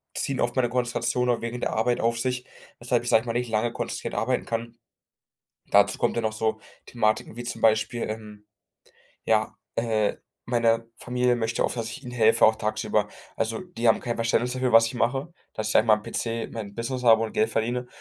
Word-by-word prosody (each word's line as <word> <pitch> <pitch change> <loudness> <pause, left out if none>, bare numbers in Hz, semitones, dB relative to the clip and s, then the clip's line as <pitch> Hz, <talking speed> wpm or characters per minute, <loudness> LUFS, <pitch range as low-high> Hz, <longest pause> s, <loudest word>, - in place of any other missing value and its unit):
ziehen 135 - -2
oft 120 - 0
meine 125 -2 +2
Konzentration 125 0 0
auch 120 -2 +1
während 115 +1 -4
der - - 0
Arbeit 120 +2 +1
auf 115 0 +1
sich, 125 +1 -2 0.3
weshalb - - 0
ich- - - -3
sage 110 - +5
ich - - -13
mal- 115 - -1
nicht 120 0 -1
lange 110 +2 0
konzentriert - - -4
arbeiten 125 +2 0
kann. 115 0 -4 0.9
Dazu - - +4
kommt - - 0
ja 115 - 0
noch 110 -1 0
so 110 0 -1 0.3
Thematiken, 110 -1 0
wie 120 - -6
zum 120 - -5
Beispiel, 110 +1 +2
ähm, 105 -1 -8 0.8
ja, - - +1 0.2
äh, 110 -2 +1 0.3
meine 115 -1 +2
Familie 125 0 +1
möchte 115 0 -1
oft, - - -1
dass 115 -1 -3
ich - - -8
ihnen 125 - -8
helfe, 115 -2 +4
auch 110 0 +5
tagsüber. 110 0 0 0.3
Also, 115 0 -1
die 150 -11 -2
haben 110 - +4
kein 120 -1 -3
Verständnis 115 +2 +1
dafür, 130 -1 -1
was 115 0 +7
ich 115 - -5
mache, 135 +7 -1 0.2
dass 110 0 -3
ich - - +3
an 110 - +4
meinem 105 -1 +4
PC 115 +1 -3
mein 105 -3 -6
Business 120 +3 -3
habe 115 -2 +6
und 110 - -3
Geld 220 +1 +2
verdiene 120 +2 -1
115 Hz, 205 wpm, -26 LUFS, 110-125 Hz, 0.9 s, was